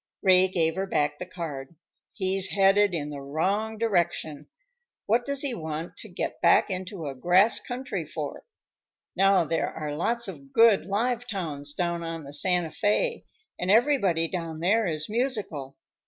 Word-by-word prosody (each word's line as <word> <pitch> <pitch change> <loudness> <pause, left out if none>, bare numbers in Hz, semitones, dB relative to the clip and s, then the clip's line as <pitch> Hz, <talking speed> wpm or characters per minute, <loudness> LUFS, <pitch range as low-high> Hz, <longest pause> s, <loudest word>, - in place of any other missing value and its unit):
Ray 185 -1 +6
gave 165 -2 0
her 195 +1 -1
back 145 -4 0
the 180 - -6
card. 165 -5 -7 0.4
"He's 190 -1 +1
headed 195 -1 +3
in 150 -2 -3
the 140 -1 -7
wrong 195 +10 -1
direction. 175 -8 -1 0.6
What 235 +3 +2
does 280 0 +1
he 275 -3 -1
want 160 -4 -5
to - - -7
get - - -5
back - - +4
into 185 -2 -5
a 140 - -4
grass 180 - +4
country 255 +2 -5
for? - - -6 0.7
Now, 195 -1 +4
there 165 +1 -1
are 150 -2 -5
lots 235 +8 0
of 140 -7 -10
good 225 -6 +5
live 240 +4 -1
towns 150 -9 -4
down 170 -1 -1
on 165 -1 -5
the 140 0 -10
Santa 175 +2 +1
Fé, 225 - 0 0.3
and 180 - -2
everybody 205 - +3
down 165 -3 -5
there 205 +5 +2
is 155 -2 -2
musical. 210 - -3
180 Hz, 160 wpm, -26 LUFS, 160-210 Hz, 0.7 s, Ray